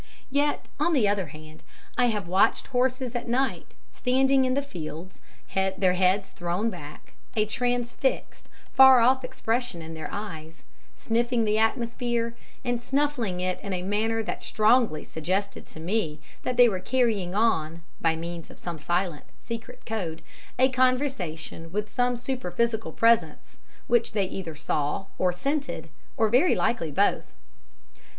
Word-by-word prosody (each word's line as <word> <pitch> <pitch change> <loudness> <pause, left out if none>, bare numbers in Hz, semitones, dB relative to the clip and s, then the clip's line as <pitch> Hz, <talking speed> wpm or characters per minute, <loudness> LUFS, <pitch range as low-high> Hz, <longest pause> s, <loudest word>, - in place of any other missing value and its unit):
Yet, 290 +1 +1
on 345 - +2
the 245 -9 +4
other 200 -3 0
hand, 155 +2 -12 0.3
I 245 - +3
have 210 -6 -1
watched 185 +3 +3
horses 255 0 +1
at 240 -1 -3
night, 260 +3 -1 0.2
standing 265 +1 +3
in 255 0 +1
the 280 - +1
fields, 170 - -8 0.4
their 190 -1 +2
heads 185 +2 +2
thrown 175 +6 -1
back, 150 -5 -11 0.2
a 215 -1 +3
transfixed, 245 - -1 0.2
far 265 -2 +8
off 260 +2 +4
expression 250 -5 -2
in 165 0 -8
their 160 -1 -6
eyes, 165 -6 -7 0.3
sniffing 235 0 0
the 215 0 +2
atmosphere 235 +1 0 0.3
and 245 -1 0
snuffling 255 -9 0
it 185 0 -1
in 200 - -4
a 180 -1 -2
manner 220 +3 0
that - - -4
strongly 215 -7 +3
suggested 185 +6 -3
to - - -11
me 165 -3 -1 0.2
they 245 -1 +5
were 195 -5 -1
carrying 215 -6 0
on, 170 -7 +1 0.2
by 165 -1 +2
means 170 0 -6
of - - -13
some 170 -3 -6
silent, 175 +1 -1
secret 230 -1 -8
code, 180 -8 -4 0.3
a 260 +1 +5
conversation 255 - -1
with 210 +2 -3
some 245 0 +1
superphysical 235 -2 -1
presence, 230 0 +2 0.3
which 235 -1 +2
they 200 -3 +2
either 180 -4 -6
saw 150 +3 -1
or 180 -1 +3
scented, 280 +11 -3 0.3
very 245 +9 +4
likely 170 -10 0
both. 195 +8 +1
220 Hz, 145 wpm, -26 LUFS, 180-245 Hz, 0.4 s, far